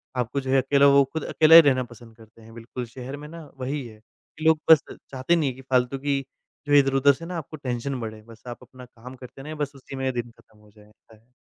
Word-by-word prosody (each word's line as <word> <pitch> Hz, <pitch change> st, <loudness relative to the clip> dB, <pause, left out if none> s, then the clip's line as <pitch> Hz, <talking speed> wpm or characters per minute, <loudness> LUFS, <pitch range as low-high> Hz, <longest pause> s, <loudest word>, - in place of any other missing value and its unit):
आपको 125 Hz, +2 st, -2 dB
जो 130 Hz, -, -7 dB
है 135 Hz, -, +4 dB
अकेला 140 Hz, +2 st, +3 dB
वो 140 Hz, 0 st, +6 dB
खुद 160 Hz, -, -3 dB
अकेला 160 Hz, +1 st, +5 dB
ही 165 Hz, -, +12 dB
रहना 135 Hz, -4 st, +2 dB
पसंद 120 Hz, -1 st, -15 dB
करते 115 Hz, 0 st, -19 dB
हैं 115 Hz, +1 st, -15 dB
बिल्कुल। 120 Hz, +2 st, -7 dB
शहर 130 Hz, +4 st, -9 dB
में 150 Hz, +1 st, -10 dB
ना 165 Hz, +1 st, -10 dB, 0.2 s
वही 135 Hz, +1 st, -4 dB
है 110 Hz, -1 st, -15 dB
कि 155 Hz, +7 st, -14 dB
लोग 160 Hz, -1 st, +4 dB
बस 155 Hz, -, +7 dB
चाहते 135 Hz, +6 st, -2 dB
नहीं 150 Hz, -5 st, 0 dB
है, 125 Hz, -, -7 dB
कि 130 Hz, -, -13 dB
फालतू 130 Hz, 0 st, 0 dB
की 140 Hz, 0 st, -1 dB, 0.5 s
जो 145 Hz, -, 0 dB
इधर-उधर 135 Hz, 0 st, +4 dB
से 165 Hz, -, -10 dB
ना 175 Hz, 0 st, -5 dB
आपको 155 Hz, 0 st, -8 dB
टेंशन 125 Hz, +1 st, -3 dB
बढ़े। 110 Hz, -1 st, -7 dB
बस 115 Hz, -1 st, -16 dB
आप 120 Hz, -, -7 dB
अपना 125 Hz, 0 st, -14 dB
काम 125 Hz, +2 st, -13 dB
करते 130 Hz, +1 st, -13 dB
रहें 155 Hz, +2 st, -8 dB
बस 145 Hz, -2 st, -3 dB
उसी 135 Hz, 0 st, -11 dB
में 130 Hz, 0 st, -2 dB
दिन 120 Hz, -1 st, -5 dB
ख़त्म 110 Hz, -1 st, -25 dB
हो 105 Hz, 0 st, -22 dB
जाए। 105 Hz, 0 st, -20 dB, 0.2 s
ह 115 Hz, +3 st, -24 dB
130 Hz, 250 wpm, -24 LUFS, 120-140 Hz, 0.5 s, ही